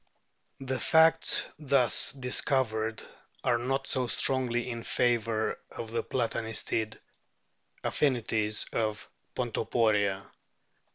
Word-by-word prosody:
The 130 -1 -3
facts 160 +6 +4
thus 140 -5 +3
dis 125 -2 0
covered 110 -5 -1 0.4
are 120 -2 +2
not 135 +3 -1
so 130 -2 -1
strongly 125 -1 +2
in 115 -2 -4
favour 115 -2 0
of 115 -1 -8
the 115 0 -1
Plata 120 0 -2
nistid 110 0 -2 0.9
affinities 115 -6 0
of 110 -2 -2 0.3
Pontoporia. 100 -4 0
120 Hz, 100 wpm, -29 LUFS, 110-130 Hz, 0.9 s, facts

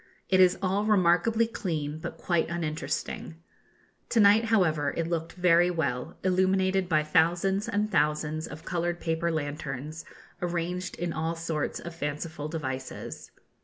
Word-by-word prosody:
It 185 - +4
is 185 -1 +6
all 195 +2 +1
remarkably 210 +3 +3
clean, 155 -9 -3
but - - -6
quite 170 -2 0
uninteresting. 160 -1 -3 0.7
To 230 - +2
night, 210 +2 +6
however, 160 -10 +2
it 165 - 0
looked 165 -1 -3
very 175 -1 +4
well, 150 -4 -2
illuminated 190 0 +2
by 155 -2 +3
thousands 175 +7 +2
and 210 -1 0
thousands 150 +1 +1
of 155 +3 -10
coloured 175 -1 -1
paper 165 0 -1
lanterns, 150 0 -4 0.4
arranged 175 +1 -2
in 175 -1 -3
all 160 +1 -2
sorts 165 -2 -2
of 170 - -7
fanciful 150 0 -4
devices. 130 -5 -5
170 Hz, 135 wpm, -28 LUFS, 155-185 Hz, 0.7 s, is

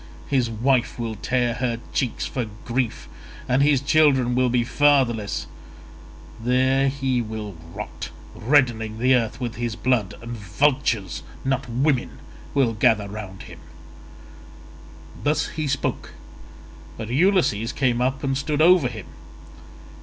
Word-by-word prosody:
His 130 -4 +1
wife 120 +2 +1
will 115 -2 -3
tear 120 +3 0
her 120 -1 -2
cheeks 130 -6 -1
for 125 -4 -3 0.2
grief 115 - -2 0.4
and 125 +2 +2
his 140 -1 +4
children 135 -3 +3
will 125 0 +2
be 120 0 +2
fatherless: 125 -5 +2 1.0
there 130 +2 +3 0.2
will 110 -5 -1
he 80 -2 -15
rot, 105 +4 -7 0.2
reddening 115 -4 +1
the 130 +3 +3
earth 115 -2 0
with 120 -1 -4
his 120 -2 -2
blood, 115 -3 0
and 115 +1 -8
vultures, 115 -1 0 0.2
not 135 -1 -1
women, 130 +2 0 0.4
will 130 -5 +3
gather 105 -1 +2
round 100 -2 -8
him." - - -12 1.6
Thus 150 +4 +1
he 155 -2 -3
spoke, 140 +1 -2 0.8
but 110 -1 -6
Ulysses 135 - +2
came 125 -3 0
up 130 +2 0
and 135 -1 0
stood 145 +2 -1
over 170 -3 +6
him. 110 -5 -7
125 Hz, 130 wpm, -23 LUFS, 115-135 Hz, 1.6 s, over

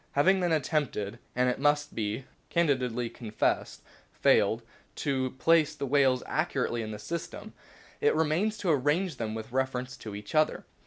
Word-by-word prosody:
Having 190 +7 +4
then 175 -2 +1
attempted, 135 - -1 0.2
and, 125 +1 +3
it 125 - 0
must 145 +1 +2
be 110 +4 -3 0.2
candidly 130 -8 +1
confessed, 110 -2 -2 0.3
failed, - - +3 0.3
to 130 -2 0
place 155 0 +3
the 140 -2 -3
whales 135 -2 +3
accurately 120 0 -1
in 110 - -5
the 105 - -5
system, 165 +11 -6 0.5
it - - +3
remains 160 +8 +1
to 185 -5 +1
arrange 150 +3 +1
them 110 -2 -3
with 110 +1 -7
reference 130 0 -1
to 105 -2 -7
each 105 0 -8
other. 155 0 +2
135 Hz, 155 wpm, -29 LUFS, 120-155 Hz, 0.5 s, Having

